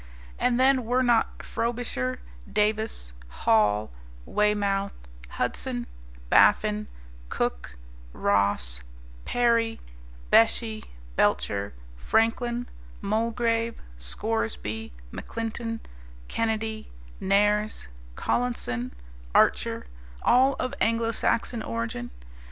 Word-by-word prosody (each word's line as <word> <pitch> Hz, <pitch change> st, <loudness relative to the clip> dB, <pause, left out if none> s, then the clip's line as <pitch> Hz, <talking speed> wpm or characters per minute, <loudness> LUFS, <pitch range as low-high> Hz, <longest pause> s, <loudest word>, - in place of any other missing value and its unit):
And 250 Hz, 0 st, +2 dB
then 260 Hz, 0 st, +4 dB
were 250 Hz, +3 st, +2 dB
not 240 Hz, -2 st, +2 dB
Frobisher, 230 Hz, -, -2 dB, 0.3 s
Davis, 210 Hz, -, 0 dB
Hall, 105 Hz, -, +2 dB, 0.3 s
Weymouth, 200 Hz, -1 st, +1 dB, 0.4 s
Hudson, 240 Hz, -, -2 dB, 0.5 s
Baffin, 210 Hz, 0 st, +4 dB, 0.4 s
Cook, -, -, -2 dB, 0.4 s
Ross, 100 Hz, -11 st, +2 dB, 0.4 s
Parry, 230 Hz, -2 st, +2 dB, 0.5 s
Bechey, 225 Hz, -1 st, +3 dB, 0.3 s
Belcher, 100 Hz, +2 st, +1 dB, 0.2 s
Franklin, 235 Hz, -, +1 dB, 0.3 s
Mulgrave, 230 Hz, +2 st, 0 dB, 0.2 s
Scoresby, 110 Hz, -, -3 dB, 0.2 s
MacClinton, 225 Hz, 0 st, -4 dB, 0.5 s
Kennedy, 220 Hz, -1 st, -2 dB, 0.3 s
Nares, 210 Hz, -, +2 dB, 0.3 s
Collinson, 125 Hz, -, -1 dB, 0.4 s
Archer, -, -, +3 dB, 0.4 s
all 265 Hz, +2 st, +5 dB
of 255 Hz, -, -3 dB
Anglo 230 Hz, 0 st, +2 dB
Saxon 230 Hz, 0 st, 0 dB
origin? 115 Hz, -, -3 dB
215 Hz, 75 wpm, -27 LUFS, -, 0.5 s, all